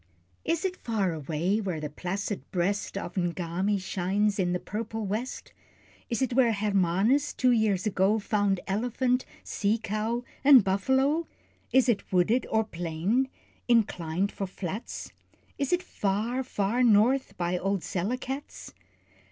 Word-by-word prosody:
Is 330 +2 0
it 370 -1 -1
far 205 -7 -1
away 160 +7 -1
where 185 -6 -3
the 150 - -3
placid 190 +6 -4
breast 195 +3 -1
Of 185 - -5
N'Gami 180 +3 0
shines 195 +3 0
in 180 -2 +1
"the 180 - 0
purple 220 +2 -4
west?" 215 +6 -4 0.6
Is 235 +3 0
it 255 - -1
where 240 -2 +4
Hermanus 205 +6 +2
two 255 -1 +3
years 215 -5 +2
ago, 200 +1 +2
Found 205 -3 0
elephant, 245 +5 0 0.2
sea 210 +2 0
cow, 225 +2 -2 0.2
and 275 -5 +8
buffalo? 265 - +1 0.4
Is 260 -1 +4
it 225 -5 0
wooded 190 +7 +2
or 220 0 +2
plain, 180 +7 -1 0.4
inclined 200 -5 +1
for 195 - -4
flats? 190 +3 -6 0.5
Is 280 -2 0
it 355 0 +2
far, 215 +6 -1
far 235 -2 -1
north 245 +3 +3
by 175 0 0
old 195 0 0
Selekats? 255 +9 -4
205 Hz, 135 wpm, -28 LUFS, 185-245 Hz, 0.6 s, and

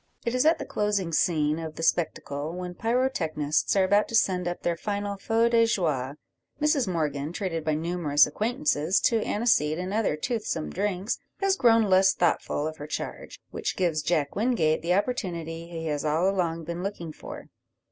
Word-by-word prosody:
It 235 - 0
is 255 +4 +3
at 325 - +5
the - - -6
closing 205 -5 -1
scene 155 -3 +2
of 160 -1 -6
the 165 - -6
spectacle, 155 -2 -1
when 180 0 -5
the 175 - -15
pyrotechnists 190 - 0
are 195 - +4
about 205 +3 +3
to 230 - -3
send 180 -5 +2
up 175 - -4
their 170 - +1
final 205 +2 -3
feu 225 +3 +1
de 230 -1 +4
joie, 145 - -1 0.4
Mrs 300 -5 +2
Morgan, 150 -4 -2
treated 175 -3 -3
by 155 -1 0
numerous 160 -2 +2
acquaintances 215 - 0
to 230 -3 +2
aniseed 160 -9 +1
and 185 +2 -4
other 215 -8 +1
toothsome 210 -3 -3
drinks, 195 +1 -2 0.2
has 390 -1 +2
grown 230 -7 +4
less 190 -1 +4
thoughtful 165 -3 0
of 155 0 -4
her 145 - -7
charge, - - -6
which - - -3
gives 170 -4 +1
Jack 150 -3 0
Wingate 205 -9 +1
the 175 +2 +1
opportunity 170 -7 -2
he 165 -1 -6
has 150 -2 -2
all 155 +4 +1
along 170 -4 0
been 170 +2 -5
looking 175 -5 -5
for. - - -10
180 Hz, 180 wpm, -26 LUFS, 155-210 Hz, 0.4 s, at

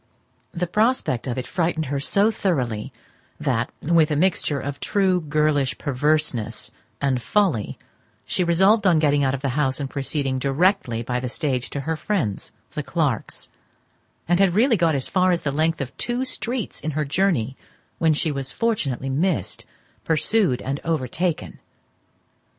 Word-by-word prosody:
The 175 +1 -2
prospect 210 - +1
of 125 - -2
it 130 - -3
frightened 165 -2 -1
her 140 +1 -2
so 200 +9 +3
thoroughly, 125 - -1 0.5
that, - - 0
with 165 0 +4
a 150 - 0
mixture 155 -3 +1
of 140 0 -5
true 190 -1 +1
girlish 150 -3 +1
perverseness 140 -5 0 0.3
and 130 -3 0
folly, 170 - +1 0.5
she 180 - 0
resolved 190 +5 +4
on 175 -3 +5
getting 145 -2 +3
out 135 0 +2
of 135 - -8
the 140 - +1
house 135 0 0
and 140 - -2
proceeding 135 -1 -2
directly 135 - +1
by 125 +1 -1
the 125 0 -3
stage 130 -2 -2
to 140 - -4
her 160 +4 -2
friends, 155 - -2 0.2
the - - -2
Clarkes; - - -2 0.8
and 175 +2 +3
had 190 -3 +4
really 235 +3 +4
got 165 -5 +2
as 135 - -1
far 185 -1 +3
as 175 - 0
the 140 - 0
length 160 +2 +1
of 130 -1 -5
two 245 +2 -1
streets 245 -3 -2
in 155 - -2
her 155 - +1
journey 140 - +1 0.4
when 160 -2 +3
she 155 +1 0
was 135 -2 -3
fortunately 140 - -1
missed, 155 - -1 0.4
pursued, 160 - +1
and 140 +2 -2
overtaken. 165 +2 -2
150 Hz, 160 wpm, -23 LUFS, 135-180 Hz, 0.8 s, on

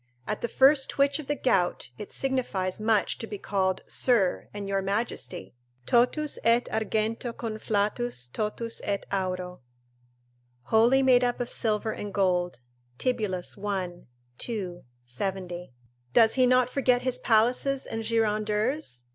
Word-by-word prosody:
At - - -3
the - - 0
first 270 +2 +4
twitch 280 +1 +2
of 300 - -7
the 290 - 0
gout 180 - 0
it 205 - -8
signifies 215 -8 -1
much 215 -1 +1
to 225 - -5
be 205 - -5
called 190 -2 -1
Sir 225 -8 +1
and 205 -1 -6
Your 195 0 0
Majesty! 195 -2 -3 0.3
"Totus 250 - +2
et 235 +1 +4
argento 220 +2 -1
conflatus, 215 - -1
totus 225 +2 -3
et 200 -1 -2
auro;" 185 -3 -3 1.1
["Wholly 240 +5 +5
made 250 -1 +5
up 245 -1 0
of 245 0 -3
silver 220 -1 0
and 205 -1 -6
gold." 180 -7 0 0.4
Tibullus, 210 - -1
i. 185 -4 -3 0.3
2, 190 -7 -4 0.2
70.] 180 +5 -4 0.4
does 225 -1 +6
he 255 -1 +4
not 255 0 +4
forget 250 -2 +2
his 255 -1 -1
palaces 250 +4 +2
and 225 - -4
girandeurs? 215 - 0
220 Hz, 135 wpm, -27 LUFS, 190-245 Hz, 1.1 s, does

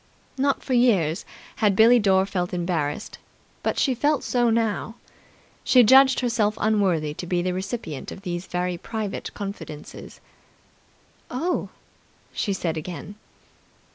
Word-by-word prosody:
Not 275 +1 0
for 260 - -2
years 200 -10 +2 0.3
had 210 -3 +2
Billie 230 +4 +6
Dore 190 -2 +3
felt 180 -2 -3
embarrassed, 170 -5 -2 0.4
but - - -1
she 265 - +2
felt 290 +3 +1
so 240 -1 +1
now. 225 -1 -1 0.7
She 250 -2 +6
judged 265 +4 +6
herself 225 -3 0
unworthy 190 -8 +1
to 175 - -7
be 175 0 0
the 180 0 -1
recipient 185 - -5
of 195 - -10
these 175 -1 -4
very 180 0 -2
private 215 -1 -5
confidences. 195 -7 -8 1.1
"Oh?" 330 +9 -2 0.6
she 205 - -1
said 170 -4 -2
again. 175 +5 -7
200 Hz, 130 wpm, -24 LUFS, 180-240 Hz, 1.1 s, Billie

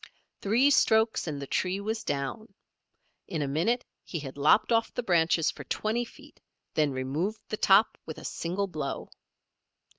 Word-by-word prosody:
Three 240 +8 +4
strokes, 220 -6 +3
and 145 -3 -3
the 140 - -5
tree 185 +7 -1
was 220 +2 -3
down. 190 +10 -4 0.7
In 160 -5 -2
a - - -2
minute 175 - 0 0.2
he 170 - -5
had 140 -4 -7
lopped 145 +11 +4
off 230 0 +2
the 245 - -3
branches 170 -4 +3
for - - -10
twenty 230 +3 -1
feet, - - -17 0.3
then 150 -2 +2
removed 145 +11 -2
the 215 - -2
top 200 +2 +4
with 160 - -6
a - - -10
single 180 +4 -2
blow. 155 -7 -5
190 Hz, 160 wpm, -28 LUFS, 150-220 Hz, 0.7 s, Three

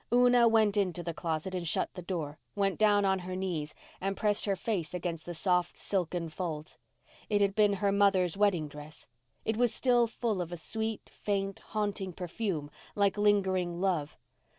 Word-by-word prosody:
Una 245 -1 +6
went 220 -2 +3
into 180 -4 0
the 170 0 -3
closet 165 +2 -3
and 180 -2 -2
shut - - 0
the 180 - -7
door, 165 -4 -4 0.2
went 195 -2 0
down 205 -2 +4
on 190 -1 +2
her 185 0 -5
knees 175 -6 -3 0.3
and 195 +1 -1
pressed 210 -2 +1
her 200 -2 +1
face 180 -4 -2
against 170 -2 -4
the 175 - -4
soft 180 0 +1
silken 175 -3 -1
folds. 155 -2 -5 0.5
It 205 -1 +3
had 200 -1 +3
been 210 -1 +4
her 200 0 +1
mother's 195 -3 +3
wedding 195 -6 +2
dress. 150 +1 -11 0.4
It 220 0 0
was 245 -1 +3
still 245 -2 +3
full 225 -4 -1
of 175 -1 -5
a 175 - -4
sweet, 220 +5 -3
faint, 195 -1 -2
haunting 205 -3 -3
perfume, 175 -4 -3 0.2
like 200 -1 +3
lingering 190 -4 +2
love. 175 -6 0
190 Hz, 175 wpm, -31 LUFS, 175-205 Hz, 0.5 s, Una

